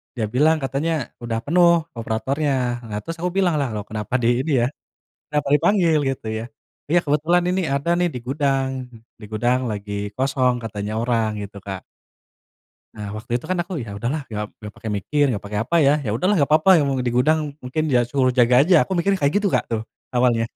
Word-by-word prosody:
dia 115 - -1
bilang 155 +4 +4
katanya, 140 +5 -1 0.3
"Udah 115 -1 -2
penuh 175 +3 +4 0.3
operatornya." 135 +7 -1 0.4
Nah, 105 - -3
terus 165 0 -5
aku 180 0 -1
bilanglah, 160 -8 +2
"Loh, 105 - -3
kenapa 105 +1 -5
di - - +3 0.2
ini 155 - -2
ya, 120 - +2 0.6
kenapa 150 -1 0
dipanggil?" 170 0 +3
Gitu 130 -4 -6
ya. 110 - -5 0.5
"Ya, - - +7
kebetulan 160 +5 +2
ini 185 +1 +1
ada 140 +5 -1
nih 175 0 +2
di - - -3
gudang. 135 -1 0 0.5
Di 105 - -10
gudang 120 +4 +1
lagi 105 -1 -5 0.2
kosong," 130 -1 +1
katanya 105 -1 -4
orang, 115 -2 +1
gitu, 100 0 -8
Kak. 95 -2 -5 1.1
Nah, 105 -1 -6
waktu 110 +2 -9
itu 130 - -12
kan 185 - 0
aku, 175 -2 -5
"Ya 110 -5 -6
udahlah." 125 +9 -2
Gak 105 -1 -5
gak 105 -1 -9
pakai 110 - -6
mikir 125 +9 0
gak 105 - -4
pakai 105 0 -3
apa 150 +9 -2
ya. 140 -3 +5
"Ya 110 - -2
udahlah 185 - +1
gak - - -2
apa-apa, 155 +4 +4
yang 155 -4 +3
mau 135 - -1
di 125 -1 -1
gudang. 150 +3 +2
Mungkin 130 +5 -2
ya 125 -4 +3
suruh 130 0 0
jaga 125 -1 +4
aja," 170 0 +5
aku - - -13
mikirnya 195 +2 +1
kayak 140 - +3
gitu, 200 - 0
Kak, - - +1
tuh 110 -1 0 0.3
awalnya. 120 -2 +2
130 Hz, 200 wpm, -22 LUFS, 115-155 Hz, 1.1 s, Ya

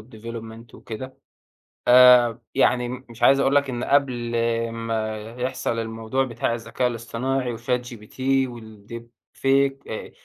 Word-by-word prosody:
development 115 +1 -9
وكده 130 +4 -8 0.7
آآ، 125 -1 +7
يعني 125 -1 +2
مش 125 -1 -9
عايز 135 +3 +6
أقول 135 0 +2
لك 140 -1 +2
إن 120 -1 -3
قبل 130 -4 +1 0.4
ما 115 -1 -3 0.2
يحصَل 125 -2 -2
الموضوع 115 +3 -2
بتاع 115 -2 -2
الذكاء 120 +2 -2
الإصطناعي 120 +1 -3
وchat 125 +2 -1
gpt 110 +2 -11 0.3
والdeepfake 120 +4 -3
آآ 110 - -6
120 Hz, 115 wpm, -23 LUFS, 115-130 Hz, 0.7 s, آآ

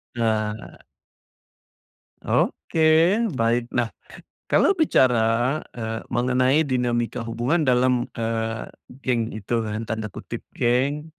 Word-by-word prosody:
Nah. 110 -2 -2 1.5
Oke, 160 - 0 0.6
baik. 115 +1 +1
Nah, 120 -2 -1 0.5
kalau - - +4
bicara, 125 - +2 0.2
eee, 110 -1 -4
mengenai 130 +5 +2
dinamika 125 -3 -1
hubungan 130 +7 0
dalam, 125 0 +2
eee, 115 -1 -2 0.4
geng 120 -2 +1
itu 110 +3 -2
kan, 105 +2 -3
tanda 110 -1 -4
kutip - - -8
"geng" 140 +6 0
120 Hz, 95 wpm, -23 LUFS, 115-130 Hz, 1.5 s, kalau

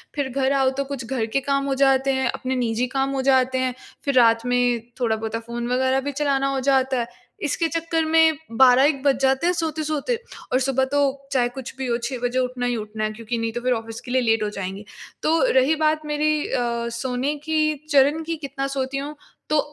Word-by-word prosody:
फिर 280 -2 -1
घर 265 +1 0
आओ 270 -1 +3
तो 275 - +1
कुछ 270 -3 -5
घर 240 -2 -1
के 230 +5 0
काम 275 0 0
हो 275 - 0
जाते 270 0 +3
हैं, 265 0 0
अपने 260 0 -3
निजी 240 0 0
काम 270 0 +1
हो - - +1
जाते 260 -1 +3
हैं, 255 -1 0 0.3
फिर 280 - +1
रात 230 -1 +5
में 245 -1 +2 0.2
थोड़ा 225 -3 +1
बोता 220 +1 -4
फ़ोन 235 0 -4
वगैरह 260 +1 +2
भी 285 - -3
चलाना 275 -1 0
हो 265 - 0
जाता 265 -1 +2
है। 235 - -2 0.4
इसके 315 +3 0
चक्कर 330 0 -1
में 320 -1 +4 0.2
12-1 265 +2 +5
बज 275 -3 +3
जाते 265 +4 +2
हैं 360 - +3
सोते-सोते। 315 - -1 0.4
और 255 - +4
सुबह 265 0 +1
तो 285 0 +2 0.3
चाहे 245 -3 +2
कुछ 260 -1 -7
भी 265 -1 -3
हो, 235 - +1
6 240 +2 -4
बजे 245 +1 0
उठना 250 -1 -2
ही 245 - 0
उठना 215 -1 -5
है 215 - 0
क्योंकि 230 +1 -4
नहीं 230 0 -2
तो 240 - -4
फिर 250 0 +2
ऑफ़िस 225 0 -5
के 245 - -9
लिए 255 0 +3
लेट 225 -2 +2
हो 210 - -1
जाएँगे। 195 +1 -6 0.4
तो 325 +1 +3
रही 265 +4 +4
बात 310 0 +1
मेरी 300 0 0
अ, 235 -1 -1
सोने 250 +4 -2
की 310 -1 +1 0.2
चरण 290 +2 +4
कि 330 +1 -3
कितना 275 -1 -4
सोती 265 +1 -2
हूँ 290 +2 -5 0.3
तो 305 -1 +3
265 Hz, 220 wpm, -23 LUFS, 240-285 Hz, 0.4 s, रात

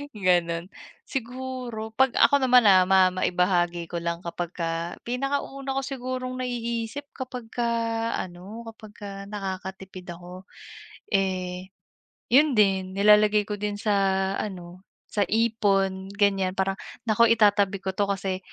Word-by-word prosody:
Hay 285 - -8
gano'n. 175 -3 +1 0.4
Siguro 250 -3 -5
'pag 265 +1 +3
ako 280 -1 +5
naman, 250 -3 +6
ah, 185 -2 +7
ma 190 -1 +6
maibahagi 175 -2 +1
ko 175 - -5
lang 170 0 -2
kapagka 170 -1 -4
pinakauna 275 +1 -2
ko - - +1
sigurong 255 -1 -4
naiisip 235 +2 -3
kapagka 250 -2 -5 0.6
ano, 190 +6 -7
kapagka 205 -2 -10
nakakatipid 190 -2 -6
ako, 180 +2 -11 0.7
eh, 185 -1 -1 0.6
yun 280 0 +5
din, 190 -2 +2
nilalagay 210 +1 +5
ko 205 0 -5
din 210 0 -2
sa 210 +1 -1 0.5
ano, 180 -3 -6 0.3
sa 205 -2 +1
ipon 200 -4 +1
ganiyan 195 -2 +1
parang, 195 0 -1 0.2
"Naku, 235 +1 +4
itatabi 205 -3 +3
ko 190 - -1
'to 200 +1 0
kasi 190 -1 -2
200 Hz, 125 wpm, -25 LUFS, 185-235 Hz, 0.7 s, ah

